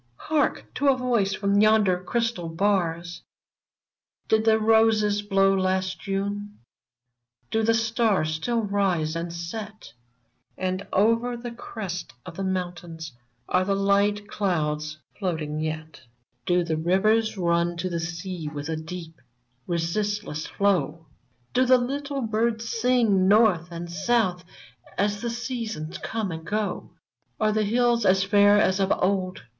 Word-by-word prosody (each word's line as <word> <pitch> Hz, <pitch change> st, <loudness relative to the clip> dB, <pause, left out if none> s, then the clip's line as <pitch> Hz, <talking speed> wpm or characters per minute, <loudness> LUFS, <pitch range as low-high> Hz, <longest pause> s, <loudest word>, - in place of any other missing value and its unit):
Hark! 305 Hz, -, 0 dB
to 285 Hz, -, 0 dB
a 270 Hz, -1 st, +5 dB
voice 235 Hz, -6 st, +1 dB
from 200 Hz, +1 st, +2 dB
yonder 210 Hz, -4 st, +3 dB
crystal 230 Hz, -5 st, -1 dB
bars: 170 Hz, -2 st, -1 dB, 0.5 s
" -, -, -56 dB
Did 220 Hz, 0 st, +3 dB
the 220 Hz, -1 st, +5 dB
roses 220 Hz, -2 st, +3 dB
blow 195 Hz, -1 st, +3 dB
last 185 Hz, -1 st, 0 dB
'Ju7ie? 200 Hz, +1 st, -3 dB, 1.0 s
Do 225 Hz, -, +1 dB
the 225 Hz, +1 st, +3 dB
stars 225 Hz, -7 st, +1 dB
still 230 Hz, +9 st, -1 dB
rise 190 Hz, -6 st, 0 dB
and 170 Hz, +1 st, -3 dB
set? 190 Hz, -, -7 dB, 0.6 s
And 185 Hz, +1 st, -3 dB
over 230 Hz, +4 st, +2 dB
the 240 Hz, 0 st, -6 dB
crests 195 Hz, -, -6 dB
of 180 Hz, -, -9 dB
the 195 Hz, -, -4 dB
mountains 175 Hz, -4 st, -4 dB, 0.4 s
Are 180 Hz, -, +2 dB
the 195 Hz, +1 st, 0 dB
light 200 Hz, +1 st, +2 dB
clouds 155 Hz, -6 st, -1 dB, 0.2 s
floating 160 Hz, -6 st, -2 dB
yet? 155 Hz, 0 st, -5 dB, 0.5 s
Do 180 Hz, 0 st, +3 dB
the 160 Hz, -2 st, -1 dB
rivers 215 Hz, +7 st, +2 dB
nm 170 Hz, -2 st, +1 dB
to 175 Hz, +2 st, -2 dB
the 170 Hz, -2 st, -2 dB
sea 170 Hz, 0 st, -5 dB
With 145 Hz, 0 st, -5 dB
a 160 Hz, -, -1 dB
deep, 165 Hz, -1 st, -8 dB, 0.5 s
resistless 175 Hz, 0 st, -2 dB
flow? 175 Hz, -5 st, 0 dB, 0.5 s
Do 255 Hz, -, +4 dB
the 255 Hz, 0 st, +6 dB
little 280 Hz, +3 st, -3 dB
birds 225 Hz, +1 st, 0 dB
sing 230 Hz, -5 st, +2 dB
north 200 Hz, -5 st, +4 dB
and 170 Hz, 0 st, -6 dB
south 190 Hz, -1 st, +1 dB, 0.5 s
As 205 Hz, 0 st, 0 dB
the 235 Hz, -, -2 dB
seasons 230 Hz, -9 st, -4 dB
come 220 Hz, -4 st, -3 dB
and 160 Hz, 0 st, -6 dB
go 210 Hz, +4 st, -3 dB
f -, -, -40 dB, 0.2 s
" -, -, -46 dB
Are 215 Hz, 0 st, +3 dB
the 215 Hz, 0 st, +1 dB
hills 240 Hz, +2 st, +2 dB
as 190 Hz, -1 st, +4 dB
fair 205 Hz, +1 st, +5 dB
as 190 Hz, -2 st, +2 dB
of 195 Hz, 0 st, +1 dB
old? 185 Hz, -1 st, -1 dB
195 Hz, 145 wpm, -25 LUFS, 170-220 Hz, 1.0 s, the